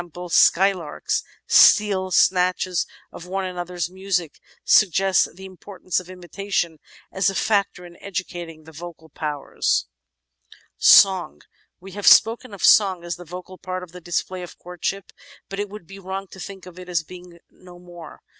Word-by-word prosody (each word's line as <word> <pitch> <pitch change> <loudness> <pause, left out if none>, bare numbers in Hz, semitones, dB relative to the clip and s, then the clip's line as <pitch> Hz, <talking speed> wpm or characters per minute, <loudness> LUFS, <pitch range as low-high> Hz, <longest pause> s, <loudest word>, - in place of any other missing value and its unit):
skylarks, 180 -3 +2 0.2
steal 195 -3 +5
snatches 185 -1 +2 0.2
of 175 - -11
one 190 +1 -3
another's 175 -2 -4
music, 185 -3 -3 0.3
suggests 195 -1 +3
the 190 +1 -11
importance 185 0 -5
of 180 0 -12
imitation 180 -2 -4 0.3
as 190 +1 +1
a 195 - -5
factor 200 -4 0
in 175 0 -14
educating 175 -4 -6
the 160 - -14
vocal 160 0 -11
powers. 145 - -2 0.9
Song 190 -3 +5 0.4
We 190 +2 -12
have 205 +2 -4
spoken 230 +1 +5
of 200 - -9
song 190 -4 +5
as 175 0 -4
the 175 - -12
vocal 180 +2 -10
part 185 0 -5
in 180 - -11
the 180 - -11
display 175 +2 -3
of 175 - -10
courtship, 180 +2 -5 0.4
but 195 - -6
it 205 0 -3
would 210 -3 -11
be 195 +3 -12
wrong 190 +1 -6
to 190 - -12
think 195 0 -9
of 180 0 -12
it 180 0 -11
as 170 -3 0
being 175 +1 -13
no 180 -1 -16
more. 175 -2 -13
180 Hz, 155 wpm, -22 LUFS, 175-195 Hz, 0.9 s, steal